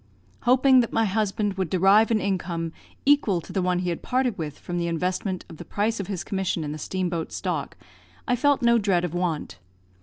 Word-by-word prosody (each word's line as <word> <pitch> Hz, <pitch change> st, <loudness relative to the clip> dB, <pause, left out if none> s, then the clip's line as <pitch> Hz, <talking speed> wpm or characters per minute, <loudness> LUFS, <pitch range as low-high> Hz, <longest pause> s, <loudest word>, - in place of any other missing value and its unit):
Hoping 260 Hz, +1 st, +6 dB
that 235 Hz, -, +1 dB
my 225 Hz, -, +2 dB
husband 205 Hz, -1 st, -1 dB
would 185 Hz, -4 st, -1 dB
derive 195 Hz, +5 st, +5 dB
an 225 Hz, -2 st, +2 dB
income 170 Hz, -4 st, -2 dB, 0.3 s
equal 275 Hz, -10 st, +4 dB
to 175 Hz, +3 st, -10 dB
the 195 Hz, -, +1 dB
one 180 Hz, 0 st, +1 dB
he 180 Hz, 0 st, -1 dB
had 170 Hz, -, -3 dB
parted 250 Hz, -3 st, 0 dB
with 155 Hz, -5 st, -5 dB
from 175 Hz, 0 st, -4 dB
the 170 Hz, -, -1 dB
investment 180 Hz, +3 st, -2 dB
of 165 Hz, -, -11 dB
the -, -, -8 dB
price 215 Hz, +2 st, -1 dB
of 195 Hz, -, -4 dB
his 195 Hz, -4 st, -3 dB
commission 190 Hz, -4 st, -2 dB
in 145 Hz, -, -4 dB
the 155 Hz, -, -6 dB
steam 185 Hz, +5 st, -2 dB
boat 170 Hz, -2 st, -3 dB
stock, -, -, -3 dB, 0.5 s
I 245 Hz, -, +3 dB
felt 280 Hz, +1 st, +2 dB
no 235 Hz, 0 st, +5 dB
dread 190 Hz, -4 st, +1 dB
of 175 Hz, -, -5 dB
want. 165 Hz, -, -2 dB
190 Hz, 215 wpm, -25 LUFS, 175-220 Hz, 0.5 s, Hoping